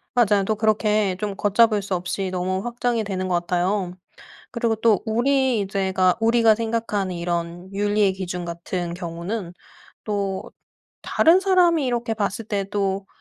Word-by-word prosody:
맞아요. 205 -4 +3
또 215 - 0
그렇게 215 -2 +1
좀 205 -2 -3
걷잡을 210 +1 +3
수 195 -1 -4
없이 185 +2 -3
너무 185 +1 -2
확장이 240 -1 -1
되는 185 -2 -3
것 180 - 0
같아요. 180 +2 -1 0.6
그리고 230 -2 0
또 220 -2 +2
우리 240 -2 +1
제가 190 -2 +1
우리가 230 -1 +4
생각하는 220 -5 -2
이런 170 +2 -4
윤리의 205 -1 +2
기준 180 -2 -5
같은 170 +1 -4
경우는 175 +2 -5 0.5
또 200 -2 -3 0.5
다른 335 +3 +4
사람이 360 -5 +3
이렇게 240 -2 -1
봤을 210 +1 -2
때도 195 -1 -2
200 Hz, 295 characters per minute, -23 LUFS, 185-225 Hz, 0.6 s, 우리가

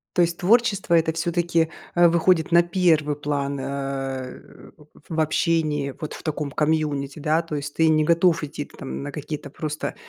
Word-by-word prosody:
То 175 - +4
есть 170 0 -1
творчество 200 -3 +2
это, 160 -1 +2
всё-таки, 170 0 0 0.2
а, 175 -1 +5
выходит 170 0 +2
на 170 0 +6
первый 170 -4 +2
план, 140 -1 -2
э, 135 -1 -4 0.7
в 160 - -3
общении, 155 -3 0
вот 155 - -5
в - - -10
таком 150 -3 -3
комьюнити, 150 -2 -1
да? 155 +2 +1
То 160 -2 -5
есть 145 0 -5
ты 160 0 +3
не 155 -1 +3
готов 170 0 +3
идти 145 0 -5
там 135 +1 -7
на 145 - -5
какие-то 150 -1 -6
просто 150 0 -4
155 Hz, 165 wpm, -23 LUFS, 145-170 Hz, 0.7 s, на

